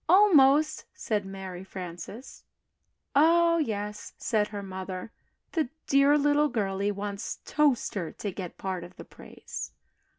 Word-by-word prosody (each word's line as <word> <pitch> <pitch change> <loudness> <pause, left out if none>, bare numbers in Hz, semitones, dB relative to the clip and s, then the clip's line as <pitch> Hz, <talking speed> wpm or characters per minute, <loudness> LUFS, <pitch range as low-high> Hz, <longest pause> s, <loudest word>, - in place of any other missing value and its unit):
"Almost!" 310 -6 +5
said 205 -3 -2
Mary 190 -2 -7
Frances. 185 - -8 0.7
"Oh, 335 +3 +5
yes," 210 -6 -3
said 215 -3 +1
her 205 -2 -6
mother, 190 +1 -6 0.4
"the 315 -7 0 0.2
dear 280 +1 +5
little 295 +1 +3
girlie 200 -3 -1
wants 200 0 -4
Toaster 250 - +1
to 205 - -5
get 180 -2 -7
part 185 -2 -3
of 175 +1 -12
the - - -10
praise." - - -9
210 Hz, 125 wpm, -28 LUFS, 190-290 Hz, 0.7 s, Almost